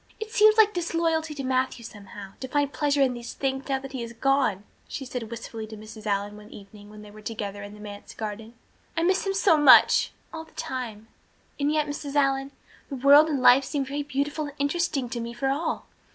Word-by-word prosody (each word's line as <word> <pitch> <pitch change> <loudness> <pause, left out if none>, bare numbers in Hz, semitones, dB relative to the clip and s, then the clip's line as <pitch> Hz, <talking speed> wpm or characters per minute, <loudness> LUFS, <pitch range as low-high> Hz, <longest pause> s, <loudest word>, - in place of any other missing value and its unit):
"It 440 0 -6
seems 430 +1 +5
like 425 -1 +6
disloyalty 330 -2 -1
to 275 - -5
Matthew, 255 -2 -1
somehow, 200 -2 -10
to 260 - -5
find 285 +1 0
pleasure 290 -2 +2
in 255 -2 +1
these 240 -1 -7
things 270 0 -3
now 270 - +2
that 270 0 -9
he 260 -2 -5
has 235 0 -6
gone," 265 -5 +1 0.2
she 270 - -6
said 245 -3 -5
wistfully 225 -1 -7
to 220 0 -9
Mrs. 215 0 -10
Allan 205 +1 -1
one 210 0 -13
evening 205 0 -13
when 210 0 -12
they 210 - -12
were 215 +1 -13
together 205 -2 -5
in 205 +1 -9
the - - -14
manse 205 -1 -10
garden. 220 +1 -6 0.4
"I 330 - +2
miss 375 +3 +1
him 390 - 0
so 375 -4 +4
much 295 - +7 0.2
all 320 -1 -6
the 320 - -21
time 225 -4 -5 0.5
and 285 +1 +1
yet, 305 -1 +1
Mrs. 290 -1 -6
Allan, 275 -1 +2 0.4
the 280 - -4
world 285 +4 +6
and 275 -4 -1
life 255 +3 +7
seem 280 0 -2
very 285 +2 -3
beautiful 290 +2 -2
and 290 -1 -9
interesting 285 -2 0
to 240 - -4
me 235 0 -6
for 270 +3 -1
all. 290 +5 -2
270 Hz, 220 wpm, -26 LUFS, 220-295 Hz, 0.5 s, much